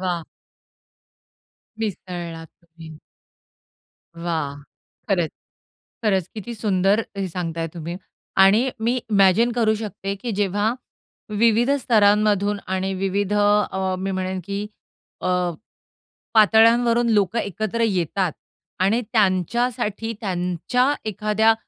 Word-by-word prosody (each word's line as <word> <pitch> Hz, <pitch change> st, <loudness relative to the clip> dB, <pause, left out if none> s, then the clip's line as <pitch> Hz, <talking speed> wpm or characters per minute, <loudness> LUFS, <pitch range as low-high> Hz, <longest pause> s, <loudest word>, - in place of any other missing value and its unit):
वाह! 175 Hz, -3 st, -2 dB, 1.5 s
मिसळलात 175 Hz, -6 st, -5 dB, 0.2 s
तुम्ही. 160 Hz, -2 st, -13 dB, 1.2 s
वाह! 165 Hz, -4 st, -3 dB, 0.5 s
खरंच. 175 Hz, -5 st, +1 dB, 0.7 s
खरंच, 190 Hz, -5 st, +1 dB
किती 225 Hz, +2 st, -6 dB
सुंदर 200 Hz, -1 st, +2 dB, 0.2 s
हे 195 Hz, -1 st, -2 dB
सांगताय 165 Hz, -2 st, -3 dB
तुम्ही. 170 Hz, +1 st, -5 dB, 0.4 s
आणि 205 Hz, +7 st, +5 dB
मी 230 Hz, +2 st, +1 dB, 0.2 s
इमॅजिन 200 Hz, +4 st, +4 dB
करू 225 Hz, -2 st, +2 dB
शकते 200 Hz, -2 st, -4 dB
की 240 Hz, -, -3 dB
जेव्हा 205 Hz, +3 st, +1 dB, 0.6 s
विविध 230 Hz, +3 st, +3 dB
स्तरांमधून 210 Hz, -3 st, +3 dB
आणि 190 Hz, +1 st, -1 dB
विविध 195 Hz, +1 st, -1 dB
अ, 205 Hz, -2 st, +2 dB
मी 195 Hz, +1 st, -2 dB
म्हणेन 185 Hz, 0 st, -2 dB
की 200 Hz, +2 st, -4 dB, 0.5 s
अ, -, -, -2 dB, 1.1 s
पातळ्यांवरून 230 Hz, +2 st, +5 dB
लोकं 205 Hz, +1 st, +2 dB
एकत्र 215 Hz, +2 st, -3 dB
येतात. 185 Hz, -2 st, 0 dB, 0.5 s
आणि 200 Hz, +6 st, +3 dB
त्यांच्यासाठी 220 Hz, +2 st, 0 dB
त्यांच्या 185 Hz, -, 0 dB
एखाद्या 215 Hz, +2 st, +2 dB
200 Hz, 95 wpm, -22 LUFS, 185-220 Hz, 1.5 s, आणि